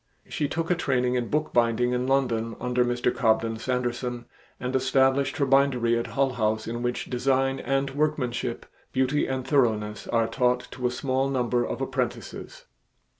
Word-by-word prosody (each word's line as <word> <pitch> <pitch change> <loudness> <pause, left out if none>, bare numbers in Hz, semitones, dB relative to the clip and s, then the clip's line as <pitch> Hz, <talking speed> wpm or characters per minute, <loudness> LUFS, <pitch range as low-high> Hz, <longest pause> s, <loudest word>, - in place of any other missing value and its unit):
She 150 - -1
took 165 +4 -2
a - - +4
training 125 -6 0
in 125 -2 -1
bookbinding 125 -5 +1
in 125 +1 -1
London 120 -4 +1
under 125 0 +1
Mr. 120 0 0
Cobden 115 0 +1
Sanderson 120 0 -2 0.3
and 125 +1 -3
established 135 +1 +2
her 140 - +2
bindery 135 -4 +3
at 115 - -1
Hull 135 -1 +1
House 110 -2 0
in 120 +1 -4
which 120 0 -2
design 135 +1 +1
and 135 +1 -1
workmanship, 145 -4 -1 0.3
beauty 130 +3 +1
and 130 -1 -3
thoroughness 110 -7 +1
are 115 -1 +1
taught 125 +1 +1
to 125 -1 -2
a - - 0
small 130 +2 -1
number 125 -2 +1
of 130 - -4
apprentices. 125 -4 -4
125 Hz, 160 wpm, -26 LUFS, 120-135 Hz, 0.3 s, a